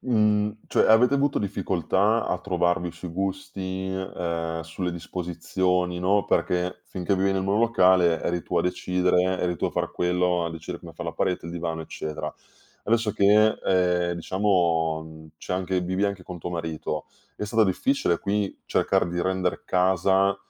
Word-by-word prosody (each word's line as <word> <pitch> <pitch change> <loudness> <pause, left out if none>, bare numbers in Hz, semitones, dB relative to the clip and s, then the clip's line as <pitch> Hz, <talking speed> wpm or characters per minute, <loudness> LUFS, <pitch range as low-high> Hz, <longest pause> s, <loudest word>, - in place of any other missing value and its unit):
mhmm, 105 -3 +2
cioè - - +2
avete 120 +5 +6
avuto 140 0 +2
difficoltà 100 +2 0
a 90 - -1
trovarvi 90 -1 0
sui 85 +2 -8
gusti, 95 +1 -4
ehm, 85 -3 -3
sulle 90 +2 -4
disposizioni, 90 +1 -1
no, 100 +2 +2
perché 90 0 0
finché 95 +1 -2
vivi 95 +1 +2
nel 95 -1 0
monolocale 95 -5 +4
eri 85 -1 -1
tu 90 - -3
a - - +2
decidere, 90 +1 +1
eri 90 -1 -1
tu - - -3
a - - -3
far - - -2
quello, 90 -1 +1
a 85 - -2
decidere 80 -1 -7
come - - -11
far - - -7
la - - -3
parete, 90 -2 -1
il 85 - -6
divano, 85 -1 -3
eccetera. 80 -1 -5 0.5
Adesso 115 -1 +1
che, 105 +3 +4
ehm, 90 -2 +2
diciamo, 85 -3 +1
mhmm, 80 0 -12
c'è - - -4
anche 95 0 -1
vivi 95 +3 -1
anche 100 -2 -2
con 90 -1 -7
tuo 85 - -5
marito, 80 -3 -4 0.3
è - - -3
stata 110 +1 +3
difficile 95 -2 +1
qui 100 0 -2
cercare - - +1
di 85 0 -2
render 95 -1 -1
casa 95 +1 +2
90 Hz, 165 wpm, -25 LUFS, 85-100 Hz, 0.5 s, avete